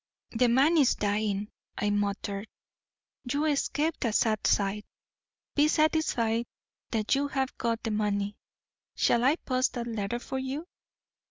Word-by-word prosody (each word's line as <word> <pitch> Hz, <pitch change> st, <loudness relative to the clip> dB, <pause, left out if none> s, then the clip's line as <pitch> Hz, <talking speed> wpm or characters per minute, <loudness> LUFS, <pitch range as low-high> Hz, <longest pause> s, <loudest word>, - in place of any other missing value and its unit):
'The 245 Hz, +1 st, +3 dB
man 280 Hz, +8 st, +4 dB
is 275 Hz, -, +4 dB
dying,' 205 Hz, 0 st, -1 dB, 0.3 s
I 205 Hz, +1 st, 0 dB
muttered. 205 Hz, 0 st, -2 dB, 0.8 s
'You 290 Hz, +3 st, +1 dB
escaped 305 Hz, +1 st, 0 dB
a 230 Hz, -, +1 dB
sad 215 Hz, -1 st, +2 dB
sight. 205 Hz, +1 st, +1 dB, 0.7 s
Be 295 Hz, +1 st, +4 dB
satisfied 250 Hz, -8 st, +1 dB, 0.4 s
that 220 Hz, -2 st, 0 dB
you 280 Hz, +1 st, +2 dB
have 270 Hz, -2 st, -2 dB
got 230 Hz, -1 st, -1 dB
the 225 Hz, -, -1 dB
money. 205 Hz, -1 st, -1 dB, 0.6 s
Shall 235 Hz, -, +3 dB
I 275 Hz, +4 st, +4 dB
post 255 Hz, -5 st, 0 dB
that 240 Hz, -2 st, -3 dB
letter 225 Hz, 0 st, -2 dB
for 265 Hz, +2 st, -4 dB
you?' 270 Hz, +5 st, -4 dB
235 Hz, 140 wpm, -28 LUFS, 210-275 Hz, 0.8 s, man